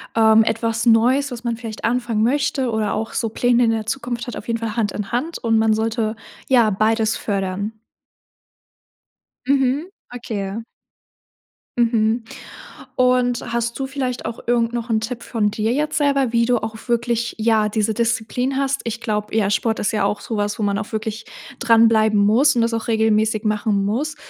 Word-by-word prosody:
ähm, 220 0 +6
etwas 230 +1 -1
Neues, 250 +5 +3
was 245 0 -7
man 235 -1 -2
vielleicht 225 -2 -8
anfangen 235 -2 0
möchte 270 +1 +1
oder 220 -2 -1
auch 220 - -3
so 225 - -1
Pläne 245 +2 +2
in 230 - +3
der 220 -1 -2
Zukunft 240 -1 -3
hat, 245 - -5
auf 230 - -9
jeden 230 0 -1
Fall 225 -1 -4
Hand 210 -4 +1
in 205 -2 -5
Hand 290 +8 -2
und 225 -2 +1
man 220 0 +3
sollte 220 0 -1 0.3
ja 240 -4 +5
beides 220 +2 +1
fördern? 200 +1 -3 1.7
Mhm. 275 +4 +1 0.3
Okay. 215 -3 -4 1.2
Mhm. 230 -1 +2 0.7
Und, 250 -1 +2
hast 235 0 -2
du 270 - -2
vielleicht 260 -3 -3
auch 225 0 -5
irgend 235 -1 +1
noch 235 0 -4
'n 220 -1 +2
Tipp 235 +2 -5
von 215 -3 0
dir 220 +2 -1
jetzt 300 +3 -1
selber, 275 -4 +1
wie 235 0 +3
du 245 0 +2
auch 220 0 -5
wirklich, 235 0 0
ja, 220 -1 +2
diese 215 0 0
Disziplin 235 +3 -1
hast. 275 0 0
Ich 230 -1 -4
glaube, 210 -2 -3
ja, 205 -3 +2
Sport 220 +2 0
ist 205 - -1
ja 215 - 0
auch 205 - -1
sowas, 205 -2 -2
wo 215 - -3
man 200 -1 0
auch 210 - -5
wirklich 220 0 -4 0.4
dran 230 -2 +5
bleiben 215 -2 +3
muss 230 +7 +4
und 230 - +3
das 230 0 0
auch 225 - -3
regelmäßig 220 -1 +2
machen 210 -1 0
muss. 280 +10 -2
230 Hz, 180 wpm, -20 LUFS, 215-245 Hz, 1.7 s, ähm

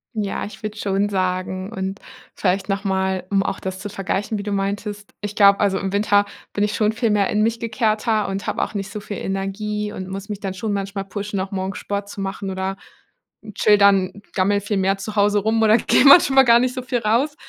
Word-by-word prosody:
Ja, 205 -2 -2
ich 210 - -8
würde 215 0 -5
schon 200 -1 0
sagen 185 0 -2
und 195 -1 -4 0.3
vielleicht 190 0 0
nochmal, 190 -2 -1
um 195 -1 +2
auch 195 - -3
das 190 0 -5
zu 190 - -5
vergleichen, 195 +2 -2
wie 200 - -5
du 205 - -4
meintest. 205 +1 -3
Ich 205 0 -5
glaube, 200 -1 +6
also, 195 -2 +2
im 190 +1 -3
Winter 205 0 +3 0.3
bin 205 - +1
ich 210 - -3
schon 215 -1 +2
viel 225 +1 0
mehr 205 -2 +2
in 210 0 +1
mich 230 +1 0
gekehrter 220 -1 0
und 195 0 -4
habe - - -2
auch - - -2
nicht 200 -1 -4
so 210 - -5
viel 205 -1 -7
Energie 210 +2 -3
und 185 0 -6
muss 195 +1 -6
mich 205 -2 -6
dann 195 -2 -3
schon 205 +3 -3
manchmal 195 0 -3
pushen, 205 0 -4
auch 190 +1 -4
morgens 190 0 -3
Sport 200 0 -4
zu 205 - -9
machen, 195 0 -4
oder 190 0 -3 0.8
chill 210 -1 +4
dann, 200 -1 +3
gammle 200 +1 +2
viel 205 +1 -2
mehr 195 +1 +1
zu 205 +2 -7
Hause 205 0 +3
rum 220 +2 +1
oder 220 +1 +6
gehe - - +3
manchmal 275 -2 +8
gar 235 -1 +6
nicht 250 +1 0
so 255 - -3
viel 250 -1 -1
raus. 235 +7 +1
200 Hz, 225 wpm, -21 LUFS, 195-210 Hz, 0.8 s, manchmal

